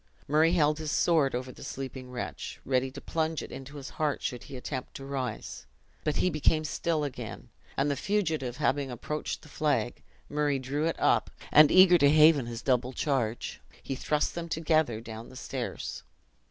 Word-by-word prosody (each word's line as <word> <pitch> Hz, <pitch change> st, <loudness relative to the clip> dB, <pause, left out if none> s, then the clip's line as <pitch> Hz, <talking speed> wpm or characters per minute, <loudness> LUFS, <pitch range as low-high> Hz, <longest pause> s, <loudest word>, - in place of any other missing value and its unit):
Murray 155 Hz, +3 st, +4 dB
held 155 Hz, -3 st, +3 dB
his 155 Hz, -1 st, -3 dB
sword 155 Hz, -7 st, +3 dB
over 130 Hz, +1 st, -4 dB
the -, -, -12 dB
sleeping 130 Hz, -1 st, -6 dB
wretch, 85 Hz, -, -5 dB
ready 130 Hz, 0 st, +1 dB
to 140 Hz, +2 st, -9 dB
plunge 160 Hz, +1 st, -1 dB
it -, -, -9 dB
into 135 Hz, +2 st, -8 dB
his 135 Hz, -2 st, -7 dB
heart 150 Hz, -2 st, 0 dB
should 125 Hz, -1 st, -3 dB
he 135 Hz, -, -8 dB
attempt 130 Hz, 0 st, -5 dB
to 135 Hz, -, -7 dB
rise; 135 Hz, -2 st, -4 dB, 0.4 s
but 150 Hz, -, 0 dB
he 185 Hz, -, +2 dB
became 155 Hz, +1 st, +2 dB
still 155 Hz, +1 st, -1 dB
again; 140 Hz, -3 st, -6 dB, 0.3 s
and 140 Hz, +2 st, +2 dB
the -, -, 0 dB
fugitive 155 Hz, -, -1 dB
having 140 Hz, -2 st, +1 dB
approached 150 Hz, +5 st, -4 dB
the -, -, -13 dB
flag, 150 Hz, -4 st, 0 dB, 0.3 s
Murray 145 Hz, -1 st, +1 dB
drew 140 Hz, +4 st, -1 dB
it 165 Hz, -, -2 dB
up, -, -, +3 dB, 0.2 s
and 150 Hz, -1 st, +8 dB
eager 185 Hz, -1 st, +7 dB
to 140 Hz, -, +6 dB
haven 150 Hz, -3 st, +6 dB
his 115 Hz, -1 st, -6 dB
double 125 Hz, -1 st, +1 dB
charge, 125 Hz, -6 st, -1 dB, 0.2 s
he -, -, -3 dB
thrust 150 Hz, +3 st, 0 dB
them 170 Hz, -1 st, -5 dB
together 155 Hz, -8 st, +1 dB
down 115 Hz, +1 st, -8 dB
the 130 Hz, -, -13 dB
stairs. -, -, -5 dB
145 Hz, 180 wpm, -29 LUFS, 130-155 Hz, 0.4 s, and